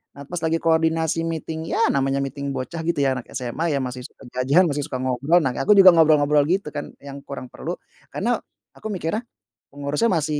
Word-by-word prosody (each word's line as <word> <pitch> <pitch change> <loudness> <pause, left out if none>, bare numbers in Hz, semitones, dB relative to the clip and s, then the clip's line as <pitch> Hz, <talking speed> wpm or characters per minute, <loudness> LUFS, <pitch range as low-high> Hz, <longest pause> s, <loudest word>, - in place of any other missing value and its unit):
Nah, 140 - -9
pas 175 +5 -5
lagi 165 0 -1
koordinasi 160 0 +1
meeting, 160 0 -4
ya, - - +2
namanya 135 0 0
meeting 140 0 -4
bocah, 135 +6 -5
gitu, 170 - +1
ya, 135 - +3
anak 120 - -12
SMA, 130 +6 -2
ya, 135 - -1
masih 125 0 -6
suka - - -20
jajan, 135 +8 +3
masih 145 0 -2
suka - - -5
ngobrol, 140 +7 +2
nah, 130 - +1
aku 205 +10 +4
juga 190 -2 +9
ngobrol-ngobrol, 150 -3 +4
gitu, 180 -3 0
kan, 145 - -7
yang 140 0 -8
kurang 140 -2 -8
perlu, - - -5 0.3
karena - - -1 0.3
aku - - -9
mikirnya 210 +4 -3 0.5
pengurusnya 145 +9 0
masih 155 -6 0
150 Hz, 195 wpm, -22 LUFS, 140-165 Hz, 0.5 s, juga